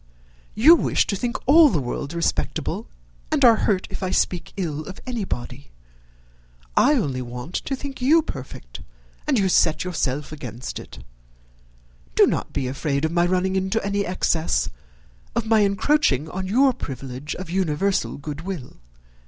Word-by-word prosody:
You 275 +10 +8
wish 340 - +2
to 200 - -2
think 235 +4 -2
all 305 +3 +7
the 170 - 0
world 140 +4 -4
respectable, 170 - -1 0.4
and 290 -4 +4
are 230 -2 +8
hurt 195 -3 +1
if - - -5
I 185 - -1
speak 180 -1 0
ill 155 -6 -2
of 190 - -9
anybody. 145 - -5 1.1
I 295 - +5
only 140 - -1
want 125 +6 -7
to 270 - -1
think 270 -1 -7
you 310 +6 +5
perfect, - - -8 0.5
and 285 -4 +3
you 195 -3 +3
set 160 -3 +3
yourself 150 -6 -2
against 125 -5 -6
it. - - -12 1.1
Do - - +7
not - - -2
be 130 - -2
afraid 140 +2 -1
of 160 - -1
my 175 0 +2
running 185 +1 +1
into 190 +3 0
any 200 0 0
excess, 170 -3 0 0.6
of 235 - 0
my 220 0 +4
encroaching 200 - +2
on 190 0 -4
your 260 +6 +4
privilege 135 - -6
of 185 -2 -7
universal 190 +1 0
good 145 +1 -6
will. 175 -7 -6
185 Hz, 155 wpm, -23 LUFS, 145-225 Hz, 1.1 s, You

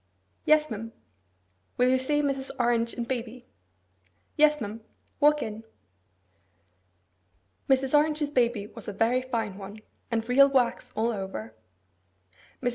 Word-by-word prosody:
'Yes, 305 0 +4
ma'am.' 225 +1 -6 0.8
'Will 250 +1 +4
you 260 0 +3
say 295 +3 0
Mrs. 270 -1 -2
Orange 235 -1 +1
and 235 -1 -4
baby?' 245 0 -5 0.9
'Yes, 300 0 +4
ma'am. 220 0 -6 0.4
Walk 300 0 +4
in.' 220 +1 -6 2.1
Mrs. 265 +1 +3
Orange's 300 0 +2
baby 240 -6 +1
was 225 +1 -9
a 205 - -4
very 235 +5 +2
fine 225 -6 -3
one, 200 +2 -9 0.3
and 225 -1 -1
real 275 +3 +6
wax 260 -3 0
all 225 +2 +1
over. 190 - -6 1.1
Mrs. 245 - +2
245 Hz, 125 wpm, -27 LUFS, 225-275 Hz, 2.1 s, real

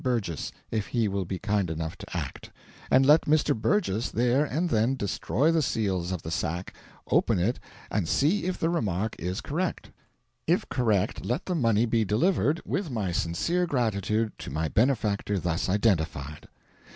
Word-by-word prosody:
Burgess 115 - -1 0.2
(if 110 -3 -1
he 115 -3 +1
will 100 -1 -2
be 95 +2 -3
kind 100 -3 0
enough 80 0 -4
to - - -6
act); - - -5 0.4
and 130 +1 +5
let 150 +3 +6
Mr. 150 -1 +3
Burgess 115 - 0
there 125 +4 +2
and 160 +4 -1
then 115 +5 +2
destroy 125 - 0
the 165 -1 +2
seals 95 - -1
of 90 -3 -4
the 80 - -5
sack, 85 +3 -3 0.4
open - - +3
it, 100 +8 0 0.3
and 100 -5 0
see 165 +9 +2
if 185 0 -1
the 165 - 0
remark 105 - -1
is 90 +3 -3
correct: 175 +5 -3 0.6
if - - +2
correct, 110 -7 0
let 125 +9 -2
the 185 - -1
money 115 -8 +3
be 115 -1 +2
delivered, 145 - +2
with 190 -4 -2
my 105 -8 -2
sincere 85 - 0
gratitude, 110 - 0
to - - -6
my 80 +4 -1
benefactor 105 - +1
thus 90 0 -1
identified." 80 -8 0
110 Hz, 165 wpm, -27 LUFS, 95-140 Hz, 0.6 s, let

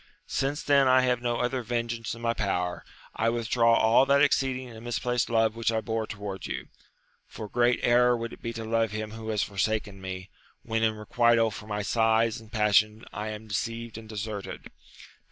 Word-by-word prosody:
Since 145 +4 -2
then 140 -3 +4
I 130 0 +6
have 125 -1 +1
no 120 -1 0
other 125 +2 -1
vengeance 115 -1 -3
in 115 - -11
my 115 0 +1
power, 90 -5 -2 0.3
I 115 - +1
withdraw 115 0 +2
all 115 +4 +4
that 140 +1 +5
ex - - +4
ceeding 130 -2 -3
and 110 0 -11
misplaced 120 0 -1
love 115 -1 +2
which 115 0 0
I 110 - +1
bore 110 -1 -2
towards 100 -3 -6
you; - - -5 0.6
for 110 - -8
great 120 +3 +2
error 120 0 +4
would 115 0 -5
it - - -12
be 115 - -3
to 115 -1 -6
love 115 0 +1
him 110 0 -5
who 110 0 -7
has 105 -2 +1
for 100 - -8
saken 105 -1 0
me, 95 0 -6 0.3
when 115 -1 -1
in 110 -1 +2
requital 115 +1 +2
for 105 +1 -9
my 105 -1 -2
sighs 115 +1 +2
and 110 -1 -16
passion 105 0 +2
I 105 +1 -4
am 110 0 -6
deceived 115 +2 -4
and 110 0 -9
deserted. 105 -1 -6
115 Hz, 200 wpm, -27 LUFS, 110-120 Hz, 0.6 s, I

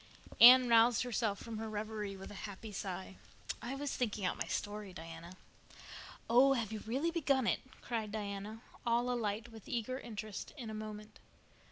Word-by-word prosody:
Anne 250 +1 +10
roused 230 0 +5
herself 225 -4 0
from 225 -2 -6
her 220 0 -4
reverie 210 -2 -4
with 190 - -9
a 205 +1 -6
happy 205 +2 -8
sigh. 190 -1 -5 0.4
"I 245 +4 -4
was 285 0 -3
thinking 215 -5 -1
out - - +1
my - - -3
story, 205 -2 -4
Diana." 165 +1 -9 0.9
"Oh, 260 +4 +6
have 230 -5 -1
you 220 - -4
really 275 +9 0
begun 275 -7 +2
it?" - - +2 0.2
cried 225 -3 -2
Diana, 210 +1 -5 0.2
all 240 +1 +2
alight 220 -1 -2
with 220 -2 -12
eager 250 +2 -2
interest 215 -4 -6
in 235 -5 -6
a - - -6
moment. 215 0 -7
220 Hz, 170 wpm, -35 LUFS, 205-240 Hz, 0.9 s, Anne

